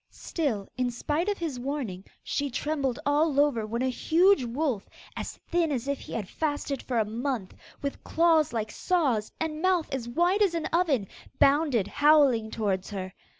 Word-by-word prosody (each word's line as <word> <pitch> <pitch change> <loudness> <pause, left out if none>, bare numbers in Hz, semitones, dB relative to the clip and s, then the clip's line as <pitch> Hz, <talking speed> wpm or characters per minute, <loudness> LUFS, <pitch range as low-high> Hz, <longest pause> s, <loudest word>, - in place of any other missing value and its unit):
Still 245 - -3
in 250 -1 +1
spite 300 - -1
of 410 - -1
his 310 -7 -4
warning 245 -9 -4 0.2
she 285 0 -1
trembled 275 -1 -1
all 290 0 +2
over 255 -7 +2
when 235 +3 -2
a 260 - +1
huge 345 +6 +3
wolf, 245 -3 -2 0.3
as - - -5
thin 335 -2 +2
as 260 -2 -2
if 280 -1 -1
he - - -11
had 210 -5 -3
fasted 290 0 -2
for 245 - -3
a 220 - +3
month, 230 -2 -3 0.3
with 280 - -4
claws 325 -3 +3
like 220 -2 -2
saws, 275 - 0
and 315 -1 -3
mouth 370 -3 +2
as 240 -3 -3
wide 350 - +2
as 380 -5 +3
an 330 - -2
oven, 300 - +2 0.3
bounded 275 - +3
howling 285 -7 +4
towards 195 -4 -2
her. 190 -2 -5
280 Hz, 175 wpm, -27 LUFS, 230-315 Hz, 0.3 s, howling